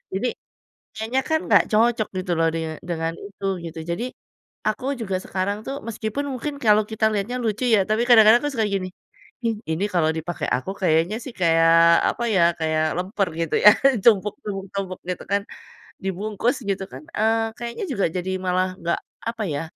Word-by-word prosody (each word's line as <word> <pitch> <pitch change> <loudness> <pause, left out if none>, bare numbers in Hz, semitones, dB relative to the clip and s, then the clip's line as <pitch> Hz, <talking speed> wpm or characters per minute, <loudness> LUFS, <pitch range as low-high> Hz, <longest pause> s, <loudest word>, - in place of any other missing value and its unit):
Jadi, 200 +6 0 0.7
kayaknya 225 +4 0
kan 315 - +3
nggak - - +6
cocok 225 0 +3
gitu 180 -1 -2
loh, 165 - +3
dinge 160 -1 -3 0.2
dengan 165 0 -1
itu 200 0 -11 0.2
gitu. 165 0 -7
Jadi, 175 +8 -2 0.6
aku 215 +3 -3 0.2
juga 195 -4 -2
sekarang 200 +2 -2
tuh, 275 - -3
meskipun 220 +5 -3
mungkin 285 +3 -4
kalau 215 -1 +5
kita 220 0 -1
lihatnya 210 +4 -2
lucu 220 +3 -1
ya, - - +4
tapi 215 +2 +2
kadang-kadang 225 0 +8
aku 290 - -1
suka 220 -3 +1
gini, 195 -2 -2 0.6
"in 225 -1 +1
ini 165 +6 0
kalau 165 -3 +3
dipakai 165 +2 -4
aku, 130 +10 -4
kayaknya 170 +5 +2
sih, 260 - -7
kayak 165 -1 +5 0.4
apa 240 - -3
ya, 180 - +4 0.2
kayak 155 -1 +1
lemper" 190 +2 -1
gitu 165 - -1
ya, - - +13 0.3
tumpuk 210 -3 +4
tumpuk 195 -2 -5
tumpuk 190 -2 -4
gitu 180 - -3
kan, 200 - +2 0.6
dibungkus 205 +6 -1
gitu 195 -1 -1
kan, 130 +3 -9
eee, 225 +1 +2
kayaknya 235 - -5
juga 200 -6 +1
jadi 180 +1 -3 0.2
malah 185 +1 +2
nggak 170 - 0 0.3
apa 230 -1 -4
ya, 145 - -2
200 Hz, 175 wpm, -23 LUFS, 175-225 Hz, 0.7 s, ya